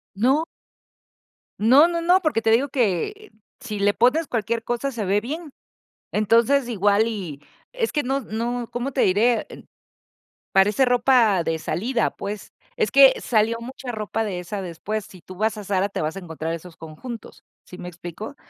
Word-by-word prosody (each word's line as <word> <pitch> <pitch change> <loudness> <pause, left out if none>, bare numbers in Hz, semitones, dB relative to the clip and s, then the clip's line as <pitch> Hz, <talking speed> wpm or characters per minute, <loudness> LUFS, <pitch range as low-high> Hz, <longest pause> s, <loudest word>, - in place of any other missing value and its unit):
No. 265 +9 +2 1.2
No, 265 +9 +6
no, 340 -1 -2
no 355 +2 +4
porque 310 -9 0
te 225 - +1
digo 255 +6 +3
que 260 - -1 0.3
si 220 -6 -6
le 205 +1 +3
pones 275 +7 +2
cualquier 230 0 -2
cosa 240 +4 -2
se 225 -5 -4
ve 200 +2 +2
bien. 305 +5 -6 0.6
Entonces, 230 +5 +3
igual 205 0 +2
y 180 -10 -6 0.3
es - - -1
que 295 - 0
no 270 +2 -1
no 235 +1 -3
¿cómo 245 +3 -3
te 260 - -1
diré?, 220 +5 +2
en - - -12 0.9
parece 205 +7 +4
ropa 245 -6 +3
de 160 0 -1
salida, 235 +10 -1
pues. 205 +1 -7 0.2
Es 445 -3 +1
que 275 -1 +7
salió 225 0 +1
mucha 250 +1 -7
ropa 220 0 -2
de 195 -4 -3
esa 190 +3 -5
después. 195 +5 -4
Si 185 - -14
tú 185 - -12
vas 215 +2 0
a 210 - -7
Zara 195 0 0
te - - -4
vas 155 +4 -2
a - - -3
encontrar 165 -2 -5
esos 170 0 -10
conjuntos, 180 +9 -9 0.2
¿sí 180 - -11
me 180 - -7
explico?, 175 - -8
225 Hz, 175 wpm, -23 LUFS, 195-260 Hz, 1.2 s, que